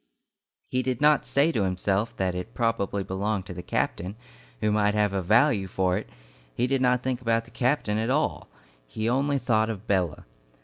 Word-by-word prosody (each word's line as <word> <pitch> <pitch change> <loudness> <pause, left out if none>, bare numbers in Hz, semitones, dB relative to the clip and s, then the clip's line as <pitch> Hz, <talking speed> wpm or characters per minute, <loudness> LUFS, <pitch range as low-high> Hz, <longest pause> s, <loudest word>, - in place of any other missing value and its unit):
He 130 - 0
did 130 -1 -2
not 150 0 +4
say 145 +4 +3
to 115 - 0
himself 95 +4 -1
that 95 -1 0
it 90 +6 -6
probably 100 -4 0
belonged 95 +1 -2
to 90 - -7
the 90 - -6
captain, 90 +2 -2 0.4
who 105 - +1
might 105 0 +2
have 105 -2 +2
a 95 - 0
value 105 - +3
for 90 0 0
it, 105 - -4 0.5
he 125 - +1
did 135 +1 0
not 125 -1 +2
think 130 -1 -2
about 115 -1 +1
the 120 - -17
captain 120 -3 0
at 115 +2 -1
all, 145 +4 0 0.4
he 110 - -3
only 140 +4 +1
thought 110 -4 +1
of 110 -1 -5
Bella. 90 -7 0
110 Hz, 190 wpm, -26 LUFS, 95-125 Hz, 0.5 s, not